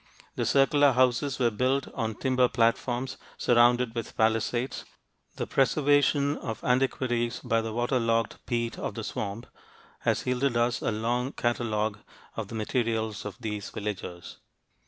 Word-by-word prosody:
The - - -1
circular 140 0 +4
houses 130 +2 +2
were 120 -3 +2
built 130 +5 0
on 110 -1 -2
timber 130 0 +2
platforms 120 +2 0 0.2
surrounded 120 0 +4
with 115 -2 -5
palisades. 115 +3 0 0.5
The - - -3
preservation 145 +2 +2
of 110 -2 -6
antiquities 125 -2 +1
by 115 -3 +1
the 110 0 -4
water 120 +3 0
logged 115 -1 0
peat 120 -1 -2
of - - -4
the - - -4
swamp 105 +3 -4 0.5
has - - 0
yielded 125 0 +1
us 120 0 +1
a - - 0
long 120 +5 -1
catalogue 110 -3 -1 0.4
of - - -4
the - - -8
materials 110 -2 -1
of 100 -2 -6
these 105 -3 -4
villagers. 95 -4 -6
120 Hz, 140 wpm, -28 LUFS, 115-130 Hz, 0.5 s, circular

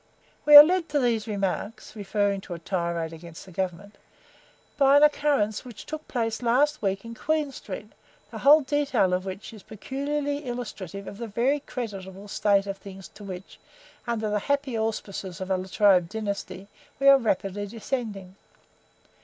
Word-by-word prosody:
"We 295 - +9
are 290 - +15
led 345 0 0
to 290 0 +1
these 235 -4 0
remarks 205 +2 -3
(referring 200 -1 -1
to 180 - -7
a - - -7
tirade 170 -2 -2
against 165 0 -11
the 190 - -14
Government) 190 +2 -5 0.8
by 275 -1 +5
an 290 - +5
occurrence 285 -8 +2
that 245 -3 -12
took 310 +1 -8
place 225 -2 -2
last 275 +6 +2
week 195 0 -1
in 230 - -7
Queen 305 +3 -1
Street, - - -8 0.4
the - - -7
whole 300 +3 +7
detail 270 -9 +1
of 185 +1 -1
which 195 +4 -7
is 215 - -11
peculiarly 285 +7 -3
illustrative 200 -6 -6
of 200 - -9
the 235 - -4
very 245 +7 +1
creditable 200 -7 -7
state 200 -1 +2
of 195 -1 -5
things, 195 -1 -11
to 210 - -14
which, 190 -1 -9 0.5
under 220 -3 -1
the 210 - +1
happy 280 +1 -1
auspices 205 -4 -4
of 190 0 -5
a 190 - +2
La 185 +1 -6
Trobe 190 -3 +4
dynasty, 200 -2 -5 0.3
we 275 - +2
are 275 0 +8
rapidly 205 -3 -1
descending. 210 -4 -5
215 Hz, 170 wpm, -26 LUFS, 195-270 Hz, 0.8 s, are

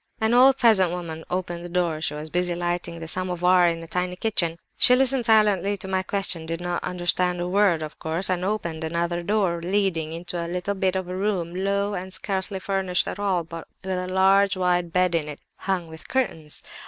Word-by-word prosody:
"An 220 0 +2
old 260 +2 +6
peasant 215 -7 +5
woman 165 -2 -5
opened 175 -1 -3
the 175 - -7
door; 170 -3 -1
she 150 - 0
was 155 +1 -7
busy 175 0 0
lighting 175 -1 -3
the 165 - -7
'samovar' 180 0 +2
in 165 0 -4
a - - -10
tiny 180 +1 -2
kitchen. 180 -5 0 0.2
She 250 - +6
listened 260 -1 +2
silently 205 -3 +3
to 190 - -3
my 190 0 0
questions, 190 -4 0
did 165 0 -2
not 175 0 -3
understand 180 0 0
a 175 - -2
word, 185 -4 +2
of 155 - -8
course, 165 +4 -1
and 180 -1 -1
opened 170 -5 -2
another 170 +2 -1
door 185 -3 0
leading 175 -4 0
into 170 +1 -4
a 170 - -5
little 180 +3 -2
bit 190 -1 0
of 185 -1 -2
a 180 - -5
room, 185 -4 -1
low 200 +2 -1
and 185 0 -5
scarcely 190 +1 -3
furnished 190 -1 0
at - - -5
all, 190 -4 0
but 165 0 -9 0.2
with 190 -1 -2
a 180 - -4
large, 190 +1 +3
wide 180 -2 +1
bed 180 0 +2
in 160 -3 0
it, 150 -1 -7 0.2
hung 185 -3 -2
with 160 0 -12
curtains. 165 - -2
180 Hz, 210 wpm, -24 LUFS, 170-195 Hz, 0.2 s, old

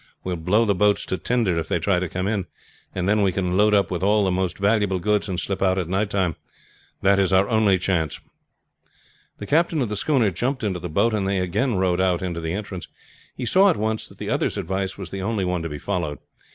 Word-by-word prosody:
We 90 - -3
will 85 - -5
blow 105 +7 +3
the 100 - +2
boats 105 +2 +2
to 95 - -2
tinder 105 -4 +1
if 80 - -4
they - - 0
try 90 +2 +1
to 90 -1 -3
come 95 +2 -2
in, 100 -4 -1 0.5
and 95 -1 -1
then 105 +1 +3
we 95 -2 +3
can 90 -1 -1
load 105 +1 +4
up 100 -2 +2
with 90 - -2
all 105 +2 +3
the 95 - +1
most 90 -2 -1
valuable 100 -1 +2
goods 105 +3 0
and 90 -2 -2
slip 100 -1 -3
out 95 -1 +2
at 90 -3 -1
night 95 +3 0
time. 95 -5 0 0.7
That 100 0 +4
is 95 -1 +2
our 95 +1 +4
only 110 -4 +3
chance." 85 -5 -1 1.2
The 100 - -7
captain 160 +5 +2
of 125 -6 0
the 105 - -3
schooner 120 -2 +2
jumped 125 +9 -2
into 95 -4 -1
the 90 +1 -6
boat, 100 +8 +2
and 100 -3 0
they 100 0 0
again 95 +7 0
rowed 95 -1 +1
out 90 -1 +1
into 85 -2 -3
the 80 0 -3
entrance. 95 -3 -5 0.5
He 125 - -4
saw 190 - +5
at 180 - +1
once 110 +1 -2
that - - -17
the - - -4
other's - - 0
advice 95 +2 -3
was 95 -3 -7
the 95 - -4
only 100 -1 -1
one 90 -1 -1
to 85 - -4
be 75 - -5
followed. 85 -5 -3
95 Hz, 245 wpm, -23 LUFS, 90-105 Hz, 1.2 s, saw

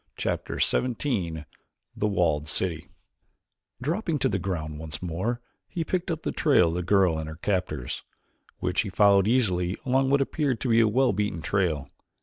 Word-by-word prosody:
Chapter - - -2
XVII 105 - 0 0.5
The 105 - 0
Walled 80 -7 +1
City 80 0 -1 0.9
Dropping 165 - -1
to - - +1
the 95 - -1
ground 80 -5 -4
once 80 -1 -5
more 95 +8 -2 0.3
he 170 - -3
picked 180 +2 -2
up 165 -2 -3
the - - -1
trail 135 - +4
of - - -3
the 90 - -1
girl 90 -3 +3
and 80 0 -5
her 80 - -7
captors, 80 -8 -2 0.6
which 90 0 0
he 105 - -4
followed 100 0 +4
easily 95 -7 +1
along 135 +1 +2
what 140 +1 +4
appeared 135 -3 0
to 130 - -1
be 115 0 +5
a 115 - +5
well 125 +2 +3
beaten 100 -5 -2
trail. 85 -5 0
100 Hz, 170 wpm, -26 LUFS, 85-125 Hz, 0.9 s, be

